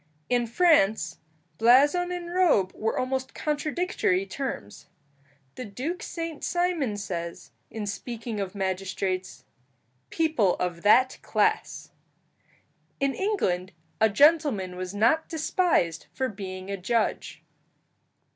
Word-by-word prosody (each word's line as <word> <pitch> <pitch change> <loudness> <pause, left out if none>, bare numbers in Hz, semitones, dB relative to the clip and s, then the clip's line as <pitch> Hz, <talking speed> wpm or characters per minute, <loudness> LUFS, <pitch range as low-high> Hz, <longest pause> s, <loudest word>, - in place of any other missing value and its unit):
In 245 -1 +1
France 235 - +3 0.4
blazon 290 +10 +5
and 350 -1 -5
robe 315 - +3
were 220 +1 -2
almost 260 0 -2
contradictory 300 - 0
terms. 190 - -6 0.7
The 255 - -7
Duke 265 - -4
Saint 330 -3 -5
Simon 345 - 0
says, 170 -4 -5 0.2
in 220 -2 -5
speaking 220 +2 -5
of 195 0 -4
magistrates, 190 -1 -3 0.7
"people 315 - +2
of 175 -2 -3
that 255 +6 +4
class." - - 0 1.1
In 275 -1 +1
England 190 - -1 0.3
a 220 0 +5
gentleman 275 - +3
was 185 +2 -5
not 235 +10 +2
despised 315 - 0
for 260 - -1
being 190 -1 -7
a 200 - -2
judge. 220 +5 -1
230 Hz, 110 wpm, -26 LUFS, 190-310 Hz, 1.1 s, blazon